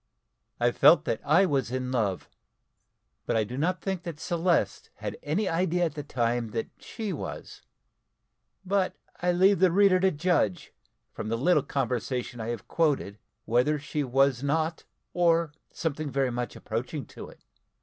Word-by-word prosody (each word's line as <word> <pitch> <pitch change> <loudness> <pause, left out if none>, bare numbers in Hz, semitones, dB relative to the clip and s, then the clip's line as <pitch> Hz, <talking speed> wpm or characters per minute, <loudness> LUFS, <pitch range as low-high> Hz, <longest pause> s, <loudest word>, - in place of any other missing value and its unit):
I - - +3
felt - - +6
that - - -1
I 160 +7 +4
was 140 -8 0
in 130 0 -3
love, 105 -7 -1 1.0
but - - 0
I 110 - +3
do 115 +4 -6
not 175 +7 0
think 190 -3 -2
that 170 -4 -7
Celeste 170 - 0
had - - -5
any 190 +8 -1
idea 175 0 +1
at 160 - -3
the 150 - -5
time 120 -4 -1
that 115 - -3
she 215 -3 -5
was - - -7 1.0
but 190 0 +1 0.3
I 180 0 +2
leave 190 +2 +4
the 185 -1 +5
reader 195 0 +5
to 190 +1 +4
judge, 150 - 0 0.4
from 110 - -5
the 115 - 0
little 150 +5 +3
conversation 125 -2 -2
I 110 - -4
have 120 -2 -5
quoted, 140 -11 0 0.3
wether 125 +6 +2
she 150 +1 -3
was 135 -1 +2
not, 160 +3 -1 0.3
or 170 -2 +3 0.2
something 155 -3 -3
very 135 -1 0
much 120 0 -4
approaching 125 +6 -4
to - - -10
it. - - -18
145 Hz, 160 wpm, -27 LUFS, 125-175 Hz, 1.0 s, felt